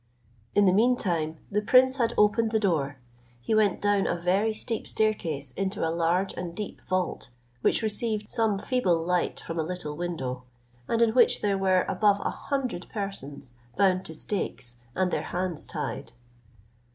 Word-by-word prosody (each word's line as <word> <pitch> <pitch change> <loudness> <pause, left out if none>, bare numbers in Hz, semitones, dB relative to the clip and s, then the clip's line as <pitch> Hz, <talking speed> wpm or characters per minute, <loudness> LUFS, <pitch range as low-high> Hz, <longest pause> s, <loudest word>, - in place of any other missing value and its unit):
In 205 - +5
the 185 - +5
mean 245 +5 +4
time, 165 -6 -1
the 210 +1 +1
prince 260 +4 +5
had 235 -3 +1
opened 215 +2 +4
the 220 0 +1
door; 150 -9 0 0.4
he 120 - -2
went 215 -3 +3
down 205 -1 +2
a - - 0
very 185 +5 +1
steep 225 +1 -4
staircase 165 -11 -1
into 190 +1 -2
a 160 - -1
large 170 +3 +1
and 175 -1 -6
deep 210 0 -6
vault, 185 -8 -1 0.3
which - - +2
received 215 0 -1
some 225 -4 +1
feeble 195 -5 +1
light 180 0 0
from 165 0 -5
a - - +1
little 160 -3 -4
window, 150 -7 -3 0.5
and 230 0 +3
in 225 - +3
which 245 -1 +4
there 200 -1 +1
were 190 -1 +3
above 200 +1 +3
a - - -1
hundred 260 -10 -3
persons, 145 - -6 0.2
bound 190 -2 +3
to 160 - -7
stakes, 150 - -3 0.2
and 185 -1 +1
their - - 0
hands 180 -3 -3
tied. - - -5
190 Hz, 170 wpm, -27 LUFS, 170-215 Hz, 0.5 s, In